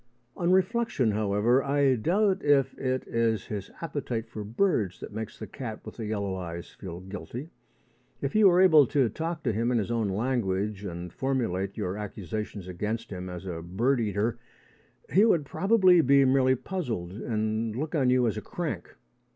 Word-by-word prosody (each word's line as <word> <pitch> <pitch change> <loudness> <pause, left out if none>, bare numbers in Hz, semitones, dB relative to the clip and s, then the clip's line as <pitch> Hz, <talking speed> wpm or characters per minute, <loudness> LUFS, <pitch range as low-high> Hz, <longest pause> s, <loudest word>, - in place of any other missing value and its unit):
On 175 +1 +1
reflection, 190 - +2
however, 105 +5 +2
I 140 -1 +3
doubt 190 - +1
if 135 -2 +3
it 130 -1 -1
is 115 -3 0
his 100 -3 -5
appetite 130 -7 -3
for 110 -1 -6
birds 110 - 0
that - - -8
makes 110 0 -5
the - - -6
cat 115 -5 -7
with - - -9
the 110 -3 -4
yellow 100 -2 -2
eyes 85 -2 -6
feel 90 -2 -8
guilty. 115 - -7 0.7
If 140 - -3
you 215 -1 +6
were 180 0 +5
able 155 -7 +7
to 135 -4 +2
talk 165 +2 -4
to 115 - +1
him 115 +3 0
in 120 - +2
his 110 +1 -1
own 115 -3 0
language, 105 -2 -1
and 85 -1 -6
formulate 115 -8 -1
your 90 +3 -2
accusations 105 -1 -5
against 105 +6 -4
him 90 -1 -5
as 90 +1 -7
a 85 -3 -5
bird 115 +11 +1
eater, 105 +1 -1 0.7
he 195 - +6
would 170 -10 +3
probably 185 0 +4
be 140 -1 +5
merely 130 0 +4
puzzled 120 - -4
and 110 +1 -2
look 150 +6 -3
on 135 -6 +2
you 125 -1 +4
as 110 - 0
a - - -3
crank. - - -5
115 Hz, 175 wpm, -28 LUFS, 100-140 Hz, 0.7 s, able